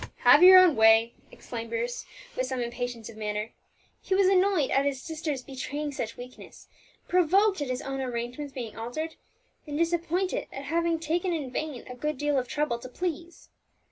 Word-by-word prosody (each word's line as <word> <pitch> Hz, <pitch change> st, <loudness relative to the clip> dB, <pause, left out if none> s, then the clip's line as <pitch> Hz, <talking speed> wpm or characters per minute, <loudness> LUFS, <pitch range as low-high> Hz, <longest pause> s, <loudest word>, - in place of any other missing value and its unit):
"Have 250 Hz, +5 st, +7 dB
your 370 Hz, +1 st, +10 dB
own 365 Hz, -4 st, +7 dB
way!" 225 Hz, +1 st, +5 dB, 0.2 s
exclaimed 230 Hz, -1 st, -7 dB
Bruce, 235 Hz, +1 st, -3 dB, 0.3 s
with 255 Hz, -, -1 dB
some 260 Hz, -1 st, -3 dB
impatience 240 Hz, -1 st, -4 dB
of 220 Hz, -, -11 dB
manner. 210 Hz, 0 st, -3 dB, 0.5 s
He 380 Hz, -, -1 dB
was 390 Hz, 0 st, +4 dB
annoyed 375 Hz, -5 st, +3 dB
at 275 Hz, -, +3 dB
his 280 Hz, -2 st, -1 dB
sister's 310 Hz, -4 st, -4 dB
betraying 285 Hz, +3 st, -5 dB
such 235 Hz, -5 st, -5 dB
weakness, 250 Hz, +1 st, -12 dB, 0.4 s
provoked 375 Hz, +2 st, +3 dB
at 285 Hz, -, -3 dB
his 255 Hz, 0 st, -3 dB
own 270 Hz, 0 st, -4 dB
arrangements 250 Hz, +3 st, -4 dB
being 245 Hz, -5 st, -7 dB
altered, 245 Hz, +8 st, -5 dB, 0.5 s
and 290 Hz, 0 st, -4 dB
disappointed 340 Hz, +2 st, 0 dB
at 275 Hz, -, -7 dB
having 335 Hz, +2 st, 0 dB
taken 340 Hz, +3 st, -1 dB
in 290 Hz, -6 st, -4 dB
vain 290 Hz, -2 st, -4 dB
a 250 Hz, -, -8 dB
good 300 Hz, +4 st, -3 dB
deal 290 Hz, 0 st, +1 dB
of 250 Hz, -, -5 dB
trouble 290 Hz, -4 st, -1 dB
to 255 Hz, -, -9 dB
please. 345 Hz, +3 st, -5 dB
280 Hz, 175 wpm, -27 LUFS, 245-330 Hz, 0.5 s, your